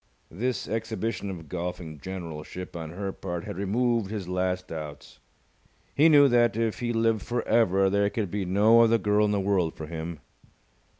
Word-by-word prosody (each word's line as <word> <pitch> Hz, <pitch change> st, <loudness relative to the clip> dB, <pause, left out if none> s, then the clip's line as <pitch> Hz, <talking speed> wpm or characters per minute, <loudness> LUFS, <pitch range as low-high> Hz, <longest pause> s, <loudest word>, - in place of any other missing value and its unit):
This 125 Hz, +8 st, -2 dB
exhibition 110 Hz, -1 st, -3 dB
of 85 Hz, -4 st, -7 dB
golfing 85 Hz, -2 st, -5 dB
generalship 90 Hz, 0 st, -7 dB
on 80 Hz, -2 st, -5 dB
her 95 Hz, +3 st, -4 dB
part 85 Hz, -2 st, -5 dB
had -, -, -6 dB
removed 110 Hz, +2 st, 0 dB
his 105 Hz, -4 st, -5 dB
last 90 Hz, 0 st, -1 dB
doubts. 75 Hz, -3 st, -8 dB, 0.7 s
He 155 Hz, +3 st, +5 dB
knew 145 Hz, -2 st, +7 dB
that, 120 Hz, -3 st, +3 dB
if 115 Hz, -1 st, -1 dB
he 120 Hz, -1 st, -1 dB
lived 115 Hz, -1 st, +1 dB
for 120 Hz, 0 st, -3 dB
ever, 95 Hz, -4 st, +3 dB
there 100 Hz, +1 st, +2 dB
could 105 Hz, -5 st, -3 dB
be 100 Hz, -1 st, -1 dB
no 105 Hz, +5 st, +5 dB
other 115 Hz, 0 st, +5 dB
girl 105 Hz, -1 st, +2 dB
in 105 Hz, -, +1 dB
the 100 Hz, -, +1 dB
world 95 Hz, -4 st, +1 dB
for 80 Hz, -, -7 dB
him. 80 Hz, 0 st, -6 dB
100 Hz, 175 wpm, -27 LUFS, 90-115 Hz, 0.7 s, knew